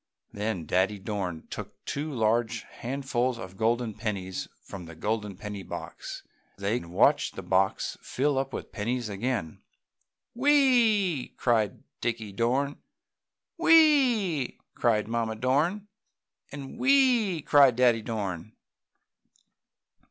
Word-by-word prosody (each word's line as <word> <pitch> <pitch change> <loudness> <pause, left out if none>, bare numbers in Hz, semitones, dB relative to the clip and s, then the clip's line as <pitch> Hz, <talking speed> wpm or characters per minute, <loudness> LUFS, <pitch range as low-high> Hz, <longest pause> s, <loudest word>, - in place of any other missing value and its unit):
Then 105 -5 -3
Daddy 95 +6 +1
Dorn 95 -5 -4
took - - -8
two 150 +2 -3
large 115 -1 0
handfuls 130 -1 -2
of 95 -4 -9
golden 115 +1 0
pennies 95 -4 -4 0.2
from 95 -3 -9
the 85 0 -11
golden 105 +2 -2
penny 105 0 -6
box - - -7 0.3
and 100 - -8
they 110 +5 +1
watched 85 +1 +2
the - - -6
box 95 +1 0
fill 140 +1 0
up 135 0 -3
with - - -6
pennies 120 +2 -2
again. 100 -4 -3 0.7
"Whee!" 235 - +3
cried 110 -5 +1 0.2
Dickie 115 -3 -2
Dorn. 130 +7 0 0.8
"Whee!" 260 - +4 0.2
cried 105 -3 +1
Mamma 115 -1 -1
Dorn, 150 - 0 0.6
and 140 - -8
"Whee!" 250 - +3
cried 140 -5 +6
Daddy 120 -2 +4
Dorn. 105 -4 -4
120 Hz, 115 wpm, -28 LUFS, 105-145 Hz, 0.8 s, cried